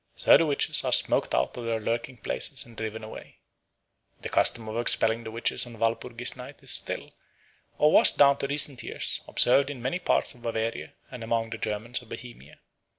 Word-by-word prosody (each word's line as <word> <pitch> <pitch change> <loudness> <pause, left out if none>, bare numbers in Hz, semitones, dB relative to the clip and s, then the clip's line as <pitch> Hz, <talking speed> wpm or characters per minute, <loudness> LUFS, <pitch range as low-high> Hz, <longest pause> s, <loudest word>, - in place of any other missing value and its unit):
So - - +4
the 165 - +2
witches 145 - +1
are - - -3
smoked - - +2
out - - -2
of 120 - -8
their 115 -1 -3
lurking 115 +3 -5
places 65 - -2
and 120 -1 -17
driven 110 0 -7
away. 110 - -12 0.8
The - - -6
custom 115 -2 +4
of 110 +2 -5
expelling 115 -1 +1
the 110 - -8
witches 115 +2 0
on 120 -1 -13
Walpurgis 115 +2 -1
Night 130 +2 -13
is - - -1
still, - - 0 0.7
or 150 +1 +2
was - - +6
down 140 -1 +3
to 140 - -2
recent 140 -2 +1
years, - - -4
observed 135 +3 +4
in 145 -3 -8
many 130 +9 -4
parts - - -1
of 120 - -20
Bavaria 115 -1 -5 0.2
and 125 -3 -9
among 115 0 -3
the 115 - -7
Germans 110 +3 -4
of 120 - -19
Bohemia. 115 - -12
115 Hz, 195 wpm, -25 LUFS, 115-125 Hz, 0.8 s, was